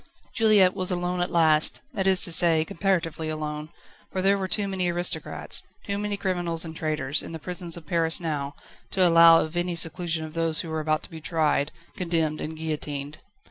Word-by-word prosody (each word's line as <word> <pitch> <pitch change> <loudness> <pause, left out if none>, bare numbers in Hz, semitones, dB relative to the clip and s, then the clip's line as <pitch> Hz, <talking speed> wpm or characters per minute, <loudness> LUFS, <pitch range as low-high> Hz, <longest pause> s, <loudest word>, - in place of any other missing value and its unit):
Juliette 210 -5 +4
was 185 -1 -2
alone 180 0 -1
at 175 - -1
last 160 -2 +3
that 195 -4 -1
is 190 -1 +4
to 175 - +3
say, 165 -2 +5
comparatively 165 -3 -1
alone, 155 0 -5 0.4
for 185 - -2
there 195 +1 +4
were 195 -1 -3
too 200 +2 0
many 190 -2 -1
aristocrats, 175 +1 -1 0.2
too 200 0 -3
many 205 -1 -2
criminals 175 -4 -2
and 160 0 -8
traitors, 155 -3 -1
in - - -9
the - - -4
prisons 175 +1 -3
of 165 - -11
Paris 165 0 +2
now, 145 -4 -4 0.3
to 185 -2 +3
allow 165 -1 +7
of 155 +2 -5
any 175 0 -1
seclusion 165 0 0
of 155 - -10
those 165 -1 +2
who 165 - -8
were 160 0 -2
about 155 0 -1
to - - -10
be 160 -1 -9
tried, 155 -3 0 0.2
condemned, 165 -4 -1
and 160 +1 -6
guillotined. 150 -1 -5
165 Hz, 195 wpm, -25 LUFS, 155-180 Hz, 0.4 s, allow